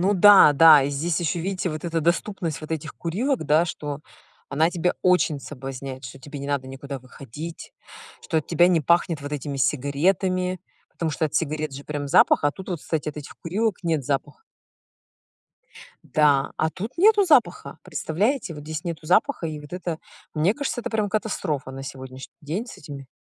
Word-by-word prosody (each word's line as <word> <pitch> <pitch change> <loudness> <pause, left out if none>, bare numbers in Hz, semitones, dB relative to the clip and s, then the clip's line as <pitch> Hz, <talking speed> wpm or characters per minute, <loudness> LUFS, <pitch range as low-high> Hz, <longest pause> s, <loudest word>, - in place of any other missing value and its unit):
ну 195 +3 +2
да-да. 165 -6 +8
И 140 - -1
здесь 160 +4 -1
ещё, 170 +1 -1
видите, 185 0 -2
вот 155 +2 -6
эта 165 -1 -1
доступность 170 0 -1
вот 155 - -9
этих 155 -1 -4
курилок, 225 - -1
да? 155 +3 +4
Что 150 -3 -5 0.5
она 160 +5 +2
тебя 180 0 0
очень 180 -5 +3
соблазняет. 135 -1 -7
Что 125 +2 -9
тебе 145 +2 -9
не 140 - -6
надо 140 -2 -1
никуда 135 +1 -7
выходить. 140 +5 -9 0.5
Что 160 - -1
от 155 - -2
тебя 175 +1 +4
не 170 -3 +3
пахнет 170 -1 +2
вот 145 +1 -6
этими 140 -1 -4
сигаретами. 180 +7 +1 0.3
Потому 165 -2 -3
что 155 - 0
от 150 - -4
сигарет 155 -2 -1
же 140 - -8
прям 145 -1 -4
запах, - - +5
а 145 - +3
тут 190 +3 -11
вот, 175 -4 -3
кстати, 155 +2 -3
от 150 - -4
этих 150 -1 -8
курилок 205 +4 -1
нет 160 -4 0
запаха. 140 - -3 1.7
Да, 145 -4 +3
а 160 0 +1
тут 210 +9 -6
нету 410 +2 +5
запаха. 290 -9 +2
Представляете, 200 - -1
вот 150 - -9
здесь 155 +2 -5
нету 165 -2 -5
запаха, 180 - +2
и 155 -1 -5
вот 150 - -13
это, 175 -3 -4 0.4
мне 165 +8 +2
кажется, 285 -4 -3
это - - -5
прям 215 -2 0
катастрофа 185 -10 -2
на 135 0 -7
сегодняшний 130 -1 -9
день 170 - -4
с - - -11
этими 140 -2 -9
160 Hz, 185 wpm, -24 LUFS, 145-180 Hz, 1.7 s, да-да